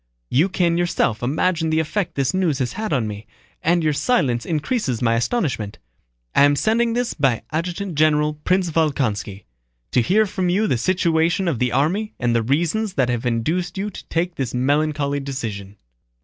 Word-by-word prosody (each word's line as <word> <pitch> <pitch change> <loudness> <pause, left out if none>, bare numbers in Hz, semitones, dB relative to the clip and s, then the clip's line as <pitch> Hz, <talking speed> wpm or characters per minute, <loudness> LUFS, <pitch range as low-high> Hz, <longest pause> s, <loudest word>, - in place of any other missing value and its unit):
You 160 +9 +3
can 175 -2 +1
yourself 170 -10 0
imagine 160 +6 0
the 160 0 +2
effect 170 +4 -2
this 135 +5 0
news 180 -7 +1
has 130 -3 -2
had 215 0 -4
on 120 -6 +1
me, 105 0 -7 0.3
and 170 +1 +2
your 155 -1 +2
silence 140 - +1
increases 150 - -1
my 115 -2 +2
astonishment. 120 - -1 0.6
I - - +4
am 145 0 +5
sending 230 +7 +1
this 245 0 -1
by 135 -7 +1
Adjutant 175 +4 -3
General 150 0 +3
Prince 180 +4 0
Volkónski, 120 - -1 0.5
to - - +3
hear 210 - +3
from 185 -2 -2
you 200 +5 +2
the 130 - 0
situation 170 +2 +1
of 150 -9 0
the 125 -1 +1
army 180 - 0
and 120 -1 +1
the 115 - +3
reasons 170 - 0
that 125 -2 +2
have 120 0 -1
induced 165 - -1
you 205 +2 -2
to - - -10
take 175 +2 -1
this 130 -6 -3
melancholy 145 +2 +1
decision. 110 -8 -5
155 Hz, 175 wpm, -21 LUFS, 125-180 Hz, 0.6 s, am